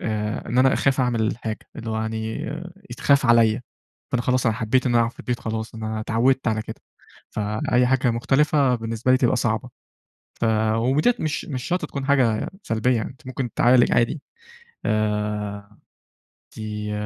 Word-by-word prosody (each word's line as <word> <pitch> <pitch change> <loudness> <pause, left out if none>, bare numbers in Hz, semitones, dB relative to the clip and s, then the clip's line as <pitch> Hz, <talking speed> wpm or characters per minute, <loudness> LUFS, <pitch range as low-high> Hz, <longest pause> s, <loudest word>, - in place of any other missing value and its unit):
آآ، 105 0 -3
إن 120 +2 0
أنا 130 +1 +5
أخاف 135 0 +2
أعمل 125 -3 +1
الحاجة، 110 0 -2 0.2
اللي 115 - -5
هو 110 - -2
يعني 110 0 -3 0.6
يتخاف 140 +3 +2
عليَّ، 115 0 +4 0.5
فأنا 125 -1 +1
خلاص 125 0 +1
أنا 115 - +2
حبيت 120 +3 +1
إن 125 - +1
أنا 120 - +5
أقعد 115 0 0
في - - -12
البيت 125 -1 -3
خلاص، 110 0 -4
أنا 110 0 -4
اتعودت 120 +4 +1
على 110 -1 0
كده. - - -9 0.5
فأي 110 +4 0
حاجة 130 +1 +3
كانت 125 -2 +1
مختلفة 135 +2 +2
بالنسبة 115 +1 -1
لي، - - +6
تبقى 130 -1 +2
صعبة. 120 +1 -1 0.7
ف - - +1 0.3
وديَّة 135 - +2
مش 155 -2 -2
مش 130 -5 -5
شرط 180 +5 -1
تكون 140 -1 -5
حاجة 125 -6 +2
سلبية 115 +3 +1
يعني 110 - -2
أنت 130 0 -15
ممكن 130 -2 -4
تتعالج 120 0 +4
عادي، 120 +6 +1 0.6
آآ 105 -1 -2 0.8
دي 105 -1 -4
115 Hz, 170 wpm, -23 LUFS, 110-130 Hz, 0.8 s, لي